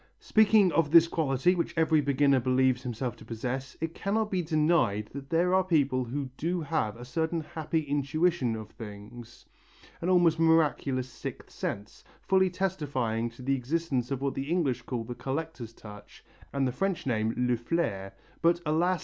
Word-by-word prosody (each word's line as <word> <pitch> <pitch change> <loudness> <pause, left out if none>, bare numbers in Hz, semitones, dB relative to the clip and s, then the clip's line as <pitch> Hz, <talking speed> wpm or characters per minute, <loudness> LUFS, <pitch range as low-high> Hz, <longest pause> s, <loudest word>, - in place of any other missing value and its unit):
Speaking 215 -3 +4
of 160 -3 +2
this 165 +1 +7
quality 155 0 +1
which 175 -2 -2
every 160 -1 +3
beginner 140 -1 +3
believes 130 0 +2
himself 125 -1 -4
to - - -13
possess, 125 +4 -5
it 165 0 -3
cannot 215 +3 -1
be 185 -2 +1
denied 155 - +1
that 140 0 -8
there 175 +2 +2
are 190 0 +4
people 140 -8 +1
who 130 +2 -4
do 175 +3 -1
have 140 -8 -1
a 120 - -9
certain 160 +5 -1
happy 160 +1 -2
intuition 145 -2 0
of 110 -1 -8
things, 110 +1 -11 0.6
an 175 - -1
almost 175 -3 +4
miraculous 150 -5 +2
sixth 120 - -8
sense, 100 +1 -5 0.2
fully 190 -1 +3
testifying 145 -12 -1
to 115 +2 -13
the 135 +2 +1
existence 135 -1 -1
of 135 -1 -3
what 140 - 0
the 135 +2 -4
English 145 -9 0
call 120 -1 -4
the 120 +2 -6
collector's 135 -2 -5
touch 105 -2 -13 0.3
and 135 -1 0
the - - -1
French 195 +6 -2
name 110 -3 0
le 125 0 +2
flair, 115 - -2 0.3
but, 170 +1 +3
alas! 170 +4 +2
140 Hz, 170 wpm, -29 LUFS, 125-165 Hz, 0.6 s, this